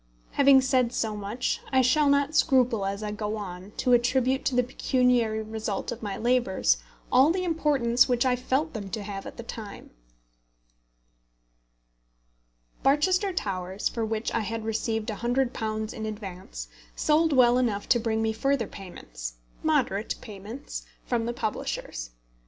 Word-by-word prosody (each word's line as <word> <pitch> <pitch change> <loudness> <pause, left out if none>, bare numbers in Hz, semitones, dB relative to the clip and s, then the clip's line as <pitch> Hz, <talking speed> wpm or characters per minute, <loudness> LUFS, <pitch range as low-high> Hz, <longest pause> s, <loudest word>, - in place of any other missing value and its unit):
Having 275 -1 +6
said 255 -2 +2
so 220 -2 -1
much, 210 +4 -2
I 260 -1 +4
shall 285 +4 +4
not 280 +1 +2
scruple 250 -10 +3
as 200 +2 -3
I 210 - -3
go 210 0 -3
on 185 -2 -7
to 250 - +2
attribute 255 +2 +2
to 260 - +1
the 250 - +4
pecuniary 245 -3 +1
result 215 -1 -3
of 240 - -6
my 205 -3 -4
labours 235 - +2 0.3
all 260 +4 +6
the 365 +2 0
importance 285 -9 +2
which 245 0 +2
I 255 -1 +3
felt 265 +5 -1
them 205 -4 -5
to 215 +1 -4
have 195 -1 -6
at - - -10
the 235 - -6
time. 220 -3 -8 2.9
Barchester 365 +8 +3
Towers, 190 - -2
for 230 - -3
which 220 0 -2
I - - +1
had 225 +1 -3
received 225 0 -1
£100 220 -1 -1
in 220 -2 -5
advance, 185 - -7 0.3
sold 315 +1 +3
well 250 -2 +5
enough 215 -5 -1
to 240 - +5
bring 220 -1 0
me 220 0 +1
further 270 +1 +1
payments - - -8 0.3
moderate 255 -10 +1
payments 215 +5 -8 0.2
from 235 -2 -1
the 240 - -1
publishers. - - -4
235 Hz, 150 wpm, -27 LUFS, 210-260 Hz, 2.9 s, Having